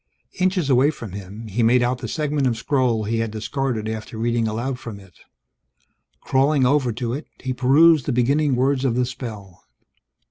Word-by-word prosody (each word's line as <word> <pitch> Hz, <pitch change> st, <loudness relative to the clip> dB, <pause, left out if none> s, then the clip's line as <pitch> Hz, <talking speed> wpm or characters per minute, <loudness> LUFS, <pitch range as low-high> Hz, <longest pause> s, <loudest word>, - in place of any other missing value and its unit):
Inches 185 Hz, -4 st, +1 dB
away 135 Hz, +1 st, +4 dB
from 120 Hz, -, -7 dB
him, 100 Hz, +3 st, -8 dB
he 110 Hz, +2 st, -2 dB
made 120 Hz, +2 st, +4 dB
out 125 Hz, +1 st, 0 dB
the 120 Hz, -, -5 dB
segment 150 Hz, +1 st, -1 dB
of 115 Hz, -2 st, 0 dB
scroll 125 Hz, -6 st, 0 dB
he 115 Hz, +2 st, -1 dB
had 115 Hz, 0 st, -1 dB
discarded 110 Hz, +1 st, -3 dB
after 110 Hz, 0 st, -6 dB
reading 115 Hz, 0 st, 0 dB
aloud 120 Hz, +4 st, -3 dB
from 110 Hz, -5 st, -8 dB
it. 95 Hz, -3 st, -17 dB, 1.1 s
Crawling 135 Hz, 0 st, +2 dB
over 135 Hz, -2 st, +2 dB
to 120 Hz, +1 st, -3 dB
it, 145 Hz, +4 st, -6 dB
he 130 Hz, 0 st, -3 dB
perused 145 Hz, +4 st, +4 dB
the -, -, +1 dB
beginning 135 Hz, +3 st, +2 dB
words 130 Hz, +1 st, +1 dB
of 125 Hz, -4 st, +1 dB
the 125 Hz, 0 st, +1 dB
spell. 110 Hz, -7 st, -8 dB
125 Hz, 180 wpm, -22 LUFS, 110-135 Hz, 1.1 s, away